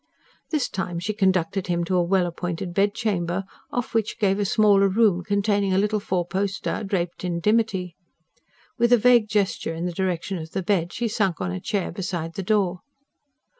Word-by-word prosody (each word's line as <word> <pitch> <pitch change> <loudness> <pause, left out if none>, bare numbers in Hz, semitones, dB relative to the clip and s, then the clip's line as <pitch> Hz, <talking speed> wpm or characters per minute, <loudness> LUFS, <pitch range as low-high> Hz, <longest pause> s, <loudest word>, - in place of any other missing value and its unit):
This 300 -5 0
time 180 -2 -4
she 185 +5 -2
conducted 190 -2 +1
him 175 -1 0
to 185 +2 -1
a 180 - +4
well 180 +1 +2
appointed 175 +1 -4
bedchamber, 195 -2 0 0.3
off 245 -1 -3
which 225 -1 0
gave 200 -3 +1
a 205 - +1
smaller 200 -1 +4
room, 195 -3 +3
containing 200 0 +1
a - - +2
little 210 +2 +1
four 185 -3 -1
poster 195 +4 -2
draped 185 -4 -2
in 175 -2 -1
dimity. 200 -3 +1 0.8
With 235 +1 +3
a 245 - +8
vague 235 -1 +4
gesture 200 -5 0
in 165 +2 -3
the 180 - -1
direction 185 0 -2
of 160 0 -9
the 190 - -2
bed, 175 -2 0
she 240 - -2
sank 200 -6 0
on 90 - -2
a 90 - -3
chair 200 -3 -2
beside 175 -3 -4
the 195 - -4
door. 190 -2 +1
190 Hz, 185 wpm, -24 LUFS, 175-210 Hz, 0.8 s, a